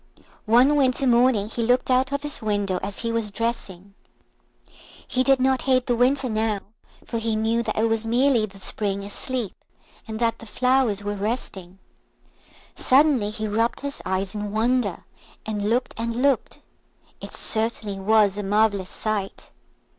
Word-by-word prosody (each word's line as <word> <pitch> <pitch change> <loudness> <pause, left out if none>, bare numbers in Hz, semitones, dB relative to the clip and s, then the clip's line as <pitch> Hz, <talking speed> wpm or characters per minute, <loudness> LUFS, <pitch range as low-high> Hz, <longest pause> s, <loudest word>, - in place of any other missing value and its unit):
One 250 +6 +5
winter 265 -1 +2
morning 240 -4 +3
he 230 +2 -3
looked 250 +3 +2
out 260 +1 +2
of 280 +1 -2
his 295 0 -4
window 205 -4 -1
as 200 0 -5
he 230 -1 -2
was 230 -2 -1
dressing. 200 -4 -4 1.1
He 255 - +1
did 270 0 +4
not 260 0 +2
hate 255 -1 +3
the 245 - +1
Winter 260 +3 +2
now, 215 -2 0 0.4
for 230 - -3
he 225 -1 -1
knew 225 +2 +1
that 215 -2 -3
it 220 - +3
was 225 0 -1
merely 240 -1 +3
the 195 -1 -15
Spring 200 0 -2
asleep, 230 +2 -4 0.5
and 220 -1 -5
that 230 0 0
the 230 - -11
flowers 250 -3 +1
were 205 0 -2
resting. 195 -3 -4 1.0
Suddenly 265 -5 +3
he 215 0 -3
rubbed 225 +3 0
his 280 0 -5
eyes 190 0 -2
in 210 -1 -4
wonder, 225 -3 0 0.4
and 210 -1 -2
looked 245 +3 0
and 230 0 -2
looked. 275 -1 +1 0.6
It - - -8
certainly 220 -3 -1
was 205 0 +3
a - - -1
marvellous 200 -2 +1
sight. 210 -3 -4
225 Hz, 160 wpm, -24 LUFS, 205-250 Hz, 1.1 s, One